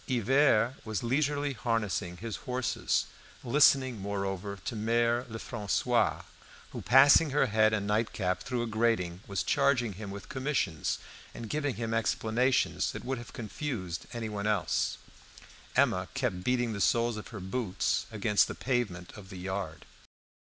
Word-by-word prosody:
Hivert 130 Hz, -1 st, +3 dB
was 110 Hz, -2 st, -3 dB
leisurely 145 Hz, +3 st, 0 dB
harnessing 105 Hz, -7 st, -2 dB
his 110 Hz, +3 st, -5 dB
horses, 125 Hz, 0 st, 0 dB, 0.4 s
listening, 130 Hz, -2 st, +4 dB
moreover, 100 Hz, 0 st, -3 dB
to 120 Hz, -, -3 dB
Mere 115 Hz, +3 st, +1 dB
Lefrancois, 110 Hz, -2 st, 0 dB, 0.5 s
who, -, -, -6 dB
passing 140 Hz, +4 st, +6 dB
her 140 Hz, 0 st, +3 dB
head 110 Hz, -2 st, +3 dB
and 105 Hz, -2 st, -1 dB
nightcap 105 Hz, -3 st, 0 dB
through 125 Hz, +1 st, -2 dB
a -, -, -1 dB
grating, 110 Hz, -6 st, 0 dB
was 100 Hz, -1 st, -1 dB
charging 135 Hz, -6 st, +2 dB
him 100 Hz, +2 st, -7 dB
with 100 Hz, 0 st, -8 dB
commissions 130 Hz, -, -1 dB, 0.4 s
and 115 Hz, -, -6 dB
giving 145 Hz, -3 st, -1 dB
him 115 Hz, -1 st, -3 dB
explanations 110 Hz, -4 st, +1 dB
that 110 Hz, +1 st, -7 dB
would 130 Hz, -1 st, -2 dB
have 120 Hz, -, -10 dB
confused 110 Hz, -, -5 dB
anyone 110 Hz, -4 st, -3 dB
else. 105 Hz, -, 0 dB, 0.8 s
Emma -, -, +3 dB
kept 90 Hz, 0 st, -1 dB
beating 125 Hz, -1 st, +1 dB
the 100 Hz, -, -4 dB
soles 115 Hz, +6 st, +2 dB
of 105 Hz, -, -7 dB
her 110 Hz, -, -8 dB
boots 95 Hz, +1 st, -1 dB
against 105 Hz, -1 st, +2 dB
the -, -, -6 dB
pavement 115 Hz, -9 st, -2 dB
of 100 Hz, -3 st, -11 dB
the 95 Hz, -, -8 dB
yard. 95 Hz, -3 st, -5 dB
115 Hz, 145 wpm, -30 LUFS, 100-125 Hz, 0.8 s, passing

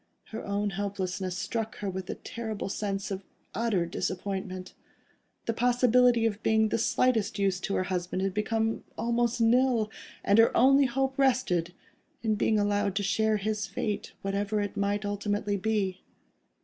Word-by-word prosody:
Her 220 Hz, -, -6 dB
own 205 Hz, 0 st, -1 dB
helplessness 190 Hz, -2 st, -3 dB
struck 225 Hz, +3 st, -3 dB
her 205 Hz, -, -4 dB
with 190 Hz, -1 st, -4 dB
the -, -, -4 dB
terrible 220 Hz, -4 st, -5 dB
sense 200 Hz, 0 st, -3 dB
of 195 Hz, 0 st, -4 dB, 0.3 s
utter 220 Hz, -7 st, +1 dB
disappointment. 185 Hz, +1 st, -4 dB, 0.7 s
The 230 Hz, -, 0 dB
possibility 245 Hz, 0 st, +4 dB
of 210 Hz, -2 st, -1 dB
being 220 Hz, 0 st, +3 dB
of 220 Hz, -, +2 dB
the -, -, +2 dB
slightest 225 Hz, -2 st, +1 dB
use 195 Hz, -2 st, +1 dB
to 195 Hz, -, -2 dB
her -, -, +1 dB
husband 185 Hz, 0 st, -2 dB
had 195 Hz, -1 st, 0 dB
become 225 Hz, +2 st, 0 dB
almost 235 Hz, 0 st, 0 dB
nil, 230 Hz, -1 st, +3 dB, 0.3 s
and 200 Hz, +2 st, +4 dB
her 225 Hz, -, +5 dB
only 275 Hz, +3 st, +6 dB
hope 265 Hz, +2 st, -1 dB
rested 185 Hz, -11 st, +2 dB, 0.5 s
in 220 Hz, -1 st, +2 dB
being 215 Hz, +1 st, +2 dB
allowed 205 Hz, -1 st, +1 dB
to 205 Hz, -, 0 dB
share 220 Hz, +2 st, +2 dB
his 210 Hz, 0 st, -2 dB
fate, 205 Hz, +2 st, -3 dB
whatever 200 Hz, +2 st, -1 dB
it 205 Hz, 0 st, -3 dB
might 200 Hz, +1 st, 0 dB
ultimately 205 Hz, 0 st, -1 dB
be. 200 Hz, -2 st, -1 dB
205 Hz, 160 wpm, -28 LUFS, 195-225 Hz, 0.7 s, only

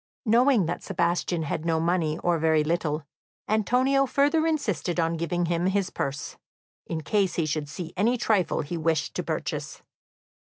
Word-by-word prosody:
Knowing 235 Hz, -2 st, +4 dB
that 170 Hz, -, -3 dB
Sebastian 175 Hz, -2 st, 0 dB
had 155 Hz, +1 st, -3 dB
no 165 Hz, -1 st, +1 dB
money, 165 Hz, -2 st, 0 dB
or 175 Hz, -1 st, +2 dB
very 160 Hz, -1 st, +3 dB
little, 155 Hz, -1 st, -1 dB, 0.4 s
Antonio 255 Hz, +6 st, +2 dB
further 290 Hz, +5 st, +2 dB
insisted 195 Hz, -, -1 dB
on 165 Hz, 0 st, +1 dB
giving 170 Hz, +1 st, -1 dB
him 170 Hz, +1 st, 0 dB
his 190 Hz, -1 st, 0 dB
purse, 140 Hz, +1 st, -4 dB, 0.5 s
in 160 Hz, -1 st, -3 dB
case 195 Hz, +1 st, +1 dB
he 165 Hz, -, +1 dB
should 150 Hz, -1 st, -2 dB
see 165 Hz, +2 st, -7 dB
any 225 Hz, +6 st, +2 dB
trifle 210 Hz, -6 st, +1 dB
he 170 Hz, +4 st, -4 dB
wished 160 Hz, -1 st, 0 dB
to -, -, -2 dB
purchase. -, -, -4 dB
175 Hz, 160 wpm, -26 LUFS, 160-215 Hz, 0.5 s, Knowing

